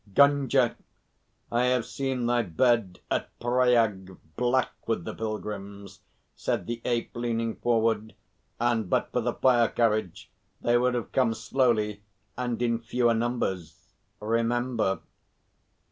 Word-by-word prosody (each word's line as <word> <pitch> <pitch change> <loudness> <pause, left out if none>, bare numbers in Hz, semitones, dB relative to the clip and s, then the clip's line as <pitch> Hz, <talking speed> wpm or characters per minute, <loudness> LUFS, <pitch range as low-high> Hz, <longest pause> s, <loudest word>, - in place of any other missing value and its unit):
"Gunga, 140 -3 +4 0.8
I 120 +1 +2
have 125 -2 +2
seen 130 -3 -2
thy 120 0 +2
bed 105 0 +1
at - - 0
Pryag 115 -6 +2 0.2
black 125 +1 +1 0.2
with 110 -7 -1
the - - -4
pilgrims," 100 -2 -6 0.4
said - - -2
the 120 0 -4
Ape, 120 0 -1
leaning 115 -1 -1
forward, 110 -2 0 0.4
"and 115 -4 +1
but - - 0
for - - 0
the - - -1
fire 120 -3 +4
carriage 110 -6 -1 0.3
they 120 - +2
would 125 +1 +2
have 120 - -3
come 125 -4 +2
slowly 110 -5 +1 0.3
and 125 -2 -2
in 115 -1 +1
fewer 120 +1 +1
numbers. 110 -8 -3 0.3
Remember." 115 -1 0
115 Hz, 125 wpm, -27 LUFS, 110-125 Hz, 0.8 s, Gunga